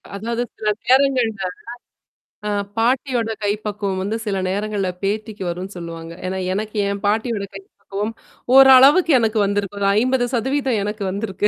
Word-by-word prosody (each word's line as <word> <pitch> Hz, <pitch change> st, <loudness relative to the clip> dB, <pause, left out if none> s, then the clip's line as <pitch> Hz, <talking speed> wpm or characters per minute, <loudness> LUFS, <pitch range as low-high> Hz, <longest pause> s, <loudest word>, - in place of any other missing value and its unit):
அதாவது 230 Hz, +4 st, -2 dB, 0.2 s
சில 215 Hz, -, 0 dB, 0.2 s
நேரங்கள்ல 250 Hz, -6 st, +2 dB, 1.0 s
ஆ -, -, -1 dB, 0.3 s
பாட்டியோட 240 Hz, -1 st, +1 dB
கைப்பக்குவம் 205 Hz, -2 st, -2 dB
வந்து 215 Hz, +3 st, -2 dB
சில 200 Hz, -2 st, -1 dB
நேரங்கள்ல 205 Hz, -1 st, -1 dB
பேத்திக்கு 210 Hz, 0 st, -3 dB
வரும்ன்னு 185 Hz, +3 st, -6 dB
சொல்லுவாங்க. 165 Hz, -1 st, -7 dB
ஏன்னா 190 Hz, +1 st, -2 dB, 0.2 s
எனக்கு 215 Hz, +2 st, -4 dB
என் 200 Hz, 0 st, -3 dB
பாட்டியோட 215 Hz, 0 st, 0 dB
கைப்பக்குவம் 195 Hz, +2 st, -6 dB, 0.4 s
ஓரளவுக்கு 270 Hz, +6 st, +8 dB
எனக்கு 225 Hz, -1 st, +1 dB
வந்திருக்கு. 200 Hz, 0 st, -2 dB
ஒரு 200 Hz, -, +1 dB
50 255 Hz, +1 st, +1 dB
சதவீதம் 265 Hz, 0 st, 0 dB
எனக்கு 210 Hz, 0 st, -4 dB
வந்திருக்கு. 200 Hz, 0 st, -1 dB
215 Hz, 130 wpm, -20 LUFS, 200-240 Hz, 1.0 s, ஓரளவுக்கு